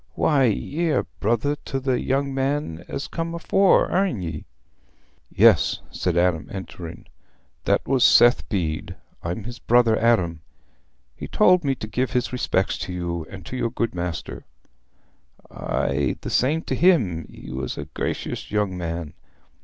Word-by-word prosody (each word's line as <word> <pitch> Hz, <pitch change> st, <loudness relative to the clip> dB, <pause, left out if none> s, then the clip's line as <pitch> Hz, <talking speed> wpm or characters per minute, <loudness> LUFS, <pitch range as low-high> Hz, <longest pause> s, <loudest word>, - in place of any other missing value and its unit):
"Why, 140 Hz, -4 st, +3 dB
ye're 150 Hz, +6 st, 0 dB
brother 120 Hz, +7 st, +1 dB
to 135 Hz, -, -2 dB
the 130 Hz, -2 st, 0 dB
young 135 Hz, +1 st, 0 dB
man 135 Hz, -, -2 dB
as 145 Hz, -, -4 dB
come 165 Hz, 0 st, -4 dB
afore, 190 Hz, +3 st, +4 dB
arena 180 Hz, -, 0 dB
ye?" 75 Hz, -, -8 dB, 0.8 s
"Yes," -, -, +4 dB
said 90 Hz, -2 st, -1 dB
Adam, 85 Hz, -3 st, +1 dB
entering. 85 Hz, -4 st, -8 dB, 0.6 s
"That -, -, +1 dB
was 130 Hz, -2 st, +3 dB
Seth 120 Hz, +1 st, +6 dB
Bede. 85 Hz, -8 st, -2 dB, 0.3 s
I'm 85 Hz, +5 st, -4 dB
his 120 Hz, +2 st, -8 dB
brother 120 Hz, -2 st, +4 dB
Adam. 90 Hz, -9 st, +2 dB, 0.7 s
He -, -, -7 dB
told 180 Hz, -1 st, +4 dB
me 135 Hz, -2 st, +1 dB
to -, -, -6 dB
give 125 Hz, +4 st, -2 dB
his 125 Hz, 0 st, 0 dB
respects 95 Hz, -6 st, 0 dB
to -, -, -5 dB
you 85 Hz, -2 st, -3 dB
and 95 Hz, -3 st, -10 dB
your 125 Hz, -2 st, -1 dB
good 115 Hz, 0 st, -2 dB
master." 85 Hz, -8 st, -5 dB, 1.1 s
"Aye, 70 Hz, -1 st, -1 dB
the -, -, -5 dB
same 150 Hz, +6 st, +2 dB
t' -, -, -3 dB
him. 115 Hz, -, +2 dB
He -, -, -11 dB
was 65 Hz, 0 st, -4 dB
a -, -, -5 dB
gracious -, -, -4 dB
young 105 Hz, -3 st, 0 dB
man. 85 Hz, -3 st, -4 dB
115 Hz, 145 wpm, -23 LUFS, 85-135 Hz, 1.1 s, Seth